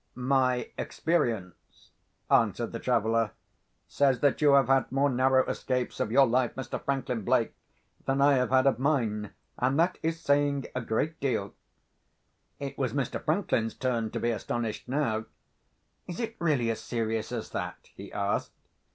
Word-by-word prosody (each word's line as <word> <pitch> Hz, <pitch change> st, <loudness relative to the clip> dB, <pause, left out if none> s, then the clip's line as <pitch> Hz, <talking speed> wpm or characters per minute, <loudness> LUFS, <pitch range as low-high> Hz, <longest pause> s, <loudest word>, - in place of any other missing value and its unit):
"My 130 Hz, -1 st, +1 dB
experience," 115 Hz, -, -2 dB, 0.4 s
answered -, -, +2 dB
the -, -, -5 dB
traveller, 115 Hz, 0 st, +1 dB, 0.5 s
"says 135 Hz, -3 st, +2 dB
that 145 Hz, 0 st, +2 dB
you 145 Hz, -2 st, +6 dB
have 140 Hz, -1 st, +6 dB
had 135 Hz, -1 st, +2 dB
more 135 Hz, +1 st, +2 dB
narrow 130 Hz, +1 st, +3 dB
escapes 125 Hz, -1 st, -2 dB
of 110 Hz, -, -1 dB
your 135 Hz, +3 st, +6 dB
life, 125 Hz, 0 st, +1 dB
Mr. 130 Hz, -2 st, -5 dB
Franklin 135 Hz, -4 st, -1 dB
Blake, -, -, +1 dB, 0.5 s
than 135 Hz, +1 st, +1 dB
I 140 Hz, +1 st, +5 dB
have 125 Hz, -2 st, +2 dB
had 130 Hz, 0 st, +4 dB
of 135 Hz, -3 st, +3 dB
mine; 115 Hz, -8 st, 0 dB, 0.3 s
and 130 Hz, +4 st, +1 dB
that 175 Hz, +2 st, +2 dB
is 165 Hz, +1 st, -1 dB
saying 140 Hz, -2 st, +1 dB
a 125 Hz, -, -2 dB
great 145 Hz, +8 st, -1 dB
deal." 120 Hz, -7 st, -1 dB, 1.1 s
It -, -, -6 dB
was -, -, 0 dB
Mr. -, -, -2 dB
Franklin's 115 Hz, 0 st, 0 dB
turn 120 Hz, -4 st, -1 dB
to -, -, -4 dB
be 120 Hz, -, +1 dB
astonished 115 Hz, 0 st, -3 dB
now. 115 Hz, -6 st, 0 dB, 0.8 s
"Is 175 Hz, -, -6 dB
it 230 Hz, -1 st, -3 dB
really 140 Hz, -9 st, +1 dB
as 115 Hz, -, -4 dB
serious 115 Hz, -2 st, -2 dB
as -, -, -4 dB
that?" -, -, -5 dB
he -, -, -10 dB
asked. 100 Hz, 0 st, -1 dB
130 Hz, 160 wpm, -28 LUFS, 115-140 Hz, 1.1 s, you